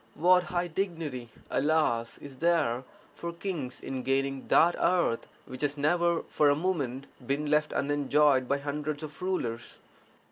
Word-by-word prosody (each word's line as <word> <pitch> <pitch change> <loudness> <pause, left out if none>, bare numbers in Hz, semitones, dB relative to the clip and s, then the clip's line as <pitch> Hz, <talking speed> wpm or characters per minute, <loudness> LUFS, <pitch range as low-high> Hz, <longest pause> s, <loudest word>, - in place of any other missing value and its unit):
What 180 +3 +4
high 175 0 -1
dignity, 160 -9 -3 0.2
alas, 145 -7 +1
is 140 -2 -11
there 145 -7 +1 0.3
for 170 - -5
kings 170 -7 -4
in 130 -1 -4
gaining 135 +1 -1
that 170 +1 +5
earth 175 -10 +1 0.2
which 130 0 -7
has 145 0 0
never 170 +3 +2
for 150 - +2
a 145 - +4
moment 145 -6 -2 0.2
been 140 +2 -1
left 150 0 +2
unenjoyed 145 -2 +2
by 140 - +1
hundreds 145 +1 -4
of 150 +3 -9
rulers! 125 -11 -3
150 Hz, 145 wpm, -29 LUFS, 135-170 Hz, 0.3 s, that